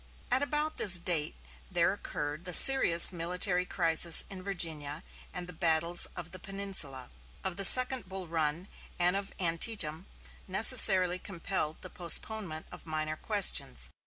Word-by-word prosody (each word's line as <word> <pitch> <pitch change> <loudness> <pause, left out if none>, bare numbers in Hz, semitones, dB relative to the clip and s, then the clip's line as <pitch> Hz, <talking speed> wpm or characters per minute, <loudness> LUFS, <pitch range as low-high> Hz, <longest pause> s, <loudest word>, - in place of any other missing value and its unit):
At 255 +2 0
about 300 +2 -5
this 185 -3 +3
date 170 -3 -3 0.3
there - - -1
occurred 150 +3 -8
the 180 - -6
serious 180 -9 +6
military 180 +2 -3
crisis 165 0 +3
in 190 -1 -10
Virginia; 160 -6 -4 0.3
and 180 - -8
the 180 - -13
battles 170 +1 +1
of 175 -1 -11
the 185 - -12
Peninsula, 190 - -4 0.3
of 190 -2 -6
the 195 - -4
second 255 0 +6
Bull 190 -2 -6
Run, 160 +2 -4 0.3
and 180 +1 -1
of 200 0 -6
Antietam 170 -1 -3 0.4
necessarily 190 -3 +4
compelled 175 -4 -6
the 185 - -11
postponement 175 -1 -1
of - - -15
minor 155 0 -5
questions. 140 - -1
175 Hz, 140 wpm, -27 LUFS, 160-195 Hz, 0.4 s, serious